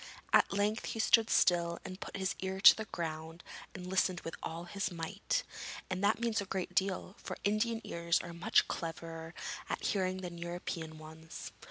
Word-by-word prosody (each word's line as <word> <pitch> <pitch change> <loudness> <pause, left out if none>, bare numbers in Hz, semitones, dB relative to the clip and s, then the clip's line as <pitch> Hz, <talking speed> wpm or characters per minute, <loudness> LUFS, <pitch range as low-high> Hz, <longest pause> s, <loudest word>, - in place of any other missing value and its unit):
At - - +6
length 205 +2 +1
he 225 - -4
stood 225 0 +5
still 170 -1 +4
and 185 +1 -6
put - - -5
his 190 -1 0
ear 190 0 -2
to - - +10
the 220 - -4
ground 160 -2 -5 0.3
and 180 -1 -6
listened 185 -1 +1
with 165 - -5
all 165 +1 -4
his 195 +2 -2
might, 175 +4 -1 0.5
and 185 +1 -1
that 205 +2 +4
means 230 -3 +1
a - - -4
great 185 -1 -3
deal, 190 0 0
for - - -6
Indian 225 +3 +1
ears 170 0 +1
are 170 - -7
much 200 +7 +3
cleverer 165 0 -5 0.3
at - - -2
hearing 185 -2 0
than 175 -2 -6
European 170 -2 -4
ones. 160 +1 -9
180 Hz, 180 wpm, -34 LUFS, 170-200 Hz, 0.5 s, to